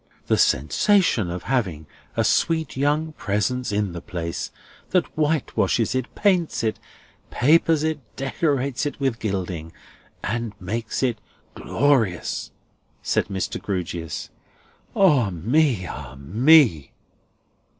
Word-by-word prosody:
"The - - +2
sensation 185 - +3
of 90 0 -5
having 95 - -1 0.3
a - - +3
sweet 160 -3 +1
young 150 +4 +1
presence 120 +2 -1
in 105 -2 0
the 85 0 -7
place, 85 -4 -4 0.4
that 180 -2 +2
whitewashes 150 -6 +1
it, 130 -1 -3
paints 180 - +1
it, 110 0 -1 0.5
papers 155 +3 +3
it, 160 -1 0 0.2
decorates 135 -1 -1
it 145 - -6
with 135 -4 0
gilding, 90 -6 -3 0.5
and 110 -2 -3
makes 110 +7 -3
it 120 -5 0 0.3
Glorious!" 120 -10 0 0.5
said - - +1
Mr. 95 -2 -3
Grewgious. 85 -4 -4 0.6
"Ah 150 - +4
me! 115 - +1
Ah 65 -6 -8
me!" 105 - +4
115 Hz, 110 wpm, -23 LUFS, 95-145 Hz, 0.6 s, Ah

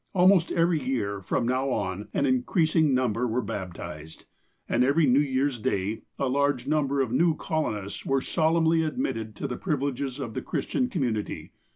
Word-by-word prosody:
Almost 180 -1 +5
every 165 -2 +2
year, 105 -7 -2
from 115 +5 -1
now 130 +2 0
on, 95 -4 -2
an 140 - +1
increasing 155 +3 +2
number 125 -1 +1
were 120 +2 -1
baptized. 80 -6 -7 0.4
And 120 - +2
every 145 +5 +3
New 130 0 +4
Year's 135 -2 0
Day, 100 +1 -1 0.2
a - - 0
large 140 -1 +1
number 140 -2 +1
of 125 -4 -1
new 160 +5 +3
colonists 105 - -3
were 135 0 +1
solemnly 160 +3 +2
admitted 135 - -3
to - - -4
the 125 - -4
privileges 140 -4 -2
of 120 -5 -5
the - - -3
Christian 255 -2 -1
community. 120 - -2
135 Hz, 165 wpm, -27 LUFS, 115-155 Hz, 0.4 s, Almost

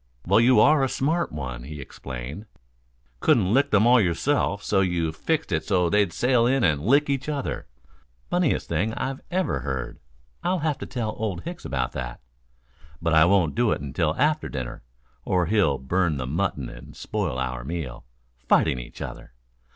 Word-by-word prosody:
"Well, 100 +5 +4
you 120 0 +5
are 145 +3 +5
a 135 - +1
smart 160 +7 0
one," 65 -5 -5
he 75 +4 -8
exclaimed. 70 - -7 0.7
"Couldn't 95 - +3
lick 135 +3 +3
them 105 +1 +4
all 120 0 +6
yourself, 100 - 0
so 95 -2 +2
you 85 -4 0
fixed 155 - -2
it 80 -2 0
so 90 -4 +1
they'd 105 -1 +3
sail 125 -2 +2
in 135 0 +2
and 75 -4 +2
lick 140 - +3
each 140 +1 -1
other. 145 -3 -3 0.6
Funniest 175 -5 +1
thing 100 +8 -1
I 135 - -2 0.2
ever 185 +1 0
heard. 65 -3 -4 0.4
I'll 185 +1 +1
have 150 -3 0
to - - -6
tell 115 -4 -3
Old 100 -6 -2
Hicks 170 0 -7
about 65 -3 -1
that. - - -5 0.8
But 85 -1 0
I 80 0 +7
won't 90 -4 +3
do 120 -1 +2
it - - 0
till 80 0 +1
after 150 +2 +1
dinner, 65 -4 -5 0.4
or 90 -1 +1
he'll 85 -7 +2
burn 80 +3 0
the 65 - -3
mutton 75 -2 -1
and - - -11
spoil 65 - -3
our 65 -1 -3
meal. 70 -4 -5 0.4
Fighting 65 - +3
each - - -8
other!" - - -9
95 Hz, 175 wpm, -25 LUFS, -, 0.8 s, I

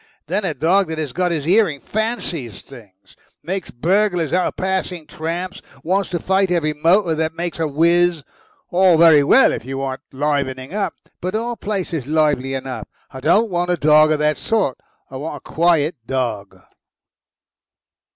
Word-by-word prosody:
Then 210 - -2
a 160 -5 -2
dog 175 +7 +2
that 160 0 -5
has 155 -4 -3
his 175 -4 0
hearing 175 -3 +2
fancies 195 - -3
things. 100 -7 -16 0.3
Makes 190 +1 -4
burglars 180 - 0
out 180 0 +2
of - - -5
passing 185 -3 -2
tramps. 170 +4 -5 0.2
Wants 190 +4 0
to 175 - -1
fight 190 +3 +1
every 165 -4 0
motor 170 +4 +2
that 160 0 -2
makes 170 0 -4
a 160 - +1
whizz. 170 +2 +2 0.5
All 180 -1 +4
very 160 -3 +6
well 265 - +5
if - - -5
you 135 +2 -5
want 135 -1 -4
livening 140 0 -2
up, 205 -1 -2 0.3
but 185 +3 -3
our 235 +2 -2
place 200 -5 -4
is 140 -6 -3
lively 145 -4 +1
enough. 130 -1 -6 0.2
I 130 - -8
don't 195 - +2
want 175 0 -1
a 180 - +1
dog 155 0 +5
of 155 - +2
that 150 0 0
sort. 210 - 0 0.3
I 130 - -6
want 150 +4 -5
a - - -11
quiet 165 -1 +1
dog." 115 -7 -3
165 Hz, 170 wpm, -20 LUFS, 145-185 Hz, 0.5 s, very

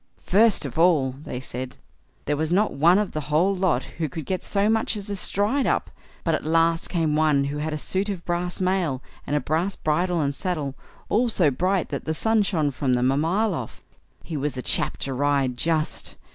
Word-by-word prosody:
"First 210 -3 +3
of 140 +2 -4
all", 160 -7 +4
they 130 -1 -7
said, 130 0 -5 0.5
"there 145 - 0
was 155 +2 -2
not 205 +4 +2
one 170 +6 +5
of 210 -1 0
the 155 - -3
whole 170 +6 +3
lot 180 -9 +1 0.2
who 160 -2 -1
could 155 +2 -6
get 185 -1 -2
so 200 0 +1
much 220 0 +1
as 205 0 -6
a - - -1
stride 210 +8 +1
up; - - 0 0.3
but 165 - +1
at - - -1
last 165 +1 +2
came 160 -4 0
one 150 -3 +3
who 140 +1 -3
had 155 +1 -2
a 155 - -2
suit 190 +6 -1
of 190 -4 -5
brass 175 0 -2
mail, 180 -8 0 0.2
and 145 - 0
a - - +3
brass 165 +7 -1
bridle 175 +3 0
and 140 -2 0
saddle, 155 -5 -2 0.3
all 240 +3 +2
so 175 -9 +3
bright 185 +6 0
that - - -4
the 160 - -1
sun 220 +5 +2
shone 160 -8 +1
from 130 -1 0
them 125 +1 +2
a - - +1
mile 185 +8 +1
off. 130 -8 -6 0.4
He 165 - -6
was 145 -2 -2
a 125 - -4
chap - - +1
to 135 - -3
ride, 140 -1 +1
just! 155 +4 -1
160 Hz, 215 wpm, -24 LUFS, 145-190 Hz, 0.5 s, one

